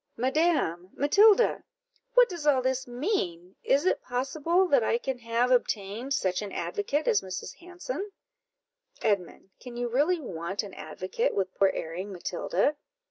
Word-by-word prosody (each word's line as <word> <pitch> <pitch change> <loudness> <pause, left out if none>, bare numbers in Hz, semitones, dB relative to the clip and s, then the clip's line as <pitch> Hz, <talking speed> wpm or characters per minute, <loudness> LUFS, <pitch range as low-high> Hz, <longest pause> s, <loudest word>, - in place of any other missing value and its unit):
"Madam! 260 - +1
Matilda! 410 - +4 0.5
what - - +7
does 340 -5 -5
all 265 -3 +4
this 260 0 -1
mean? 200 - -2
is 280 +5 +2
it - - +2
possible 300 +9 0
that 275 -8 +4
I 230 - +2
can 255 +1 -4
have 235 +2 0
obtained 235 +2 0
such 185 0 0
an 205 -2 -6
advocate 310 -8 -2
as 205 - +3
Mrs. 185 -1 -7
Hanson?" 360 +4 -6 0.9
"Edmund, 195 -2 -1
can 245 -1 -9
you 245 0 -1
really 295 +9 +2
want 190 - -4
an 200 -2 -9
advocate 185 - -3
with 190 -1 -1
poor 195 - +3
erring 180 +5 -5
Matilda? 185 - -1
245 Hz, 145 wpm, -28 LUFS, 195-310 Hz, 0.9 s, what